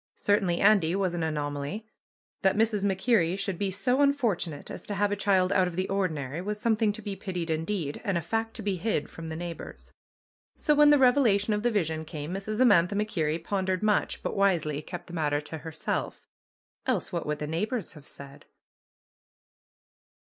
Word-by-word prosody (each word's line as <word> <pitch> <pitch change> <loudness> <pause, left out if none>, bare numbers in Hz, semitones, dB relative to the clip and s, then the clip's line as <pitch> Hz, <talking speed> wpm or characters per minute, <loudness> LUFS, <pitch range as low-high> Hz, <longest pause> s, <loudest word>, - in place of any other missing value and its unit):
Cer 205 0 +2
tainly 175 -4 0
Andy 195 -4 +4
was 190 -3 0
an 175 - -2
anomaly. 150 +5 -3 0.6
That 190 - +3
Mrs. 215 -2 +1
MacKerrie 190 -2 +2
should 195 -3 -3
be 200 - 0
so 250 +8 +1
unfortunate 230 - 0
as - - -7
to 205 - -3
have 205 +1 +1
a - - +1
child 195 -2 +2
out 185 -2 +3
of 175 - -5
the 185 +1 -1
ordinary 160 -6 -2
was 210 +2 -4
something 220 -1 +2
to 220 0 -8
be 200 -1 -4
pitied 180 -4 -4
indeed 160 -2 -2
and 195 -3 0
a - - -1
fact 225 +6 -2
to 225 - -6
be 195 -2 -1
hid 185 -5 -1
from 165 0 -8
the 160 - -5
neighbors. 170 0 -7 0.6
So 300 - +2
when 295 0 +6
the 295 - +7
revelation 240 -6 +4
of 210 - 0
the 240 - +2
vision 160 -8 -1
came 155 +1 -6
Mrs. 205 +3 -4
Amantha 200 -7 +5
MacKerrie 165 -6 -1
pondered 190 0 -1
much, 210 -1 +1
but - - -2
wisely 170 -7 +1
kept 175 +3 -8
the 175 - -12
matter 150 -3 0
to 155 +1 -7
herself. 160 0 -4 0.6
Else - - 0
what - - -2
would 150 0 -1
the 150 - -4
neighbors 195 +7 -2
have 150 -4 -14
said? 140 0 -11
190 Hz, 190 wpm, -28 LUFS, 160-210 Hz, 0.6 s, the